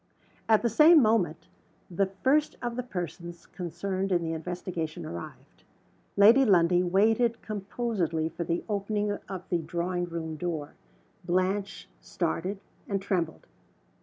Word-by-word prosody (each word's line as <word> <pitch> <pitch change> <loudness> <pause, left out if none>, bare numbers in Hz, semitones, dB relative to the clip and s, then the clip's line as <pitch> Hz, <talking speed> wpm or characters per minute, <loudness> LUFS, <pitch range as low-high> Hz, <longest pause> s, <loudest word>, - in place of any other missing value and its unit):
At 220 0 +5
the - - +3
same 310 +8 +7
moment 215 - +2 0.5
the 195 +3 +1
first 265 +10 +1
of 240 -1 -3
the 250 - -1
persons 175 -6 -6
concerned 185 +2 -4
in 175 -2 +2
the 165 0 -2
investigation 165 -1 -4
arrived. 85 0 -9 0.5
Lady 225 +7 +7
Lundie 180 -5 +4
waited 220 +6 +2
composedly 200 -6 -2
for 165 +1 -5
the 170 +1 -2
opening 205 0 -1 0.2
of 190 -2 -6
the 175 - +1
drawing 175 +2 -2
room 165 -2 -5
door. 160 -4 -4 0.5
Blanche 185 +3 -1
started, 185 +3 -3 0.3
and 200 -1 0
trembled. 180 -5 -2
185 Hz, 130 wpm, -28 LUFS, 170-210 Hz, 0.5 s, same